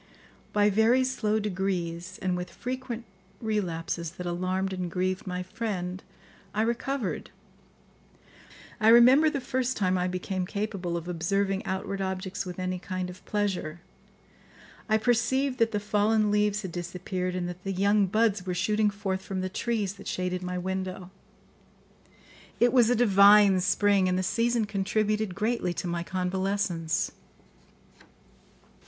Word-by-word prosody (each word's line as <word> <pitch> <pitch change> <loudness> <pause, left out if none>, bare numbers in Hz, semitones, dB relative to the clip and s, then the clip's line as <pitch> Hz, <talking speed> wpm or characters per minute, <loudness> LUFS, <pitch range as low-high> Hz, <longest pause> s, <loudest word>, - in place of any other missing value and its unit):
By 210 0 +3
very 225 +5 +4
slow 220 -4 0
degrees, 185 -3 -3
and 185 -1 +1
with 180 0 -4
frequent 250 0 -5 0.3
relapses 170 -6 -2
that 180 -1 -7
alarmed 185 +2 -1
and 180 -1 -3
grieved 185 +3 -2
my 180 0 -3
friend, 185 -3 -4 0.5
I 215 - +2
recovered. 235 -1 -2 1.5
I 215 - +2
remember 250 +7 +7
the 295 -2 -2
first 255 0 -1
time 185 -2 +1
I 180 - +1
became 185 0 -3
capable 195 -4 -3
of 170 0 -6
observing 195 +3 0
outward 195 +1 -3
objects 190 +1 -3
with 180 - -6
any 185 0 -2
kind 185 0 -4
of 180 - -14
pleasure, 190 -6 -2 1.1
I 220 - +4
perceived 250 +4 +1
that 230 -1 +3
the 210 - 0
fallen 210 +1 +2
leaves 210 0 +1
had 190 - -5
disappeared 180 +1 -4
and 180 -1 -2
that 180 +1 -8
the 195 - -2
young 200 +1 +3
buds 215 -1 +2
were 180 -1 -3
shooting 210 +4 +2
forth 200 -2 -3
from 190 -1 -4
the 185 - -2
trees 210 -1 -1
that 200 0 -12
shaded 180 0 -2
my 180 0 -3
window. 185 0 -4 1.5
It 240 0 +4
was 240 -3 +5
a 245 - +3
divine 200 -3 +6
spring, 200 0 +3
and 180 - +1
the 185 - 0
season 230 +3 +1
contributed 210 0 -1
greatly 215 -4 -1
to - - -4
my 170 -1 -2
convalescence. 185 -2 -1
195 Hz, 145 wpm, -28 LUFS, 180-215 Hz, 1.5 s, remember